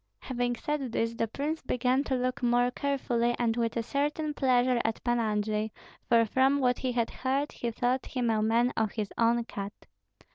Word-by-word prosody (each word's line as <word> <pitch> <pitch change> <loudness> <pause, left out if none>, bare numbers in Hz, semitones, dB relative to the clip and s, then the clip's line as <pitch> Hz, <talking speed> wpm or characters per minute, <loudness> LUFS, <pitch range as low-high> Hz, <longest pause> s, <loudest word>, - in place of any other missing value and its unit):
Having 245 -1 -1
said 275 -1 -3
this, 230 0 0
the 230 0 -1
prince 295 +8 -3
began 255 +2 +1
to 265 - 0
look 255 +2 -1
more 245 0 +3
carefully 245 -3 0
and 230 -2 +1
with 230 -1 -1
a 230 - 0
certain 295 +4 -1
pleasure 250 -2 +2
at 225 0 -2
Pan 240 -1 +1
Andrei, 215 -1 0 0.4
for 230 -1 +5
from 265 +5 +3
what 250 -2 +2
he 255 - -1
had 235 -2 0
heard 275 +3 -1
he 240 - -3
thought 245 +3 -1
him 245 -3 0
a 215 -1 +1
man 230 +3 +2
of 220 -2 0
his 210 -3 -3
own 235 +1 +2
cut. 200 -2 -6
245 Hz, 190 wpm, -29 LUFS, 230-260 Hz, 0.4 s, for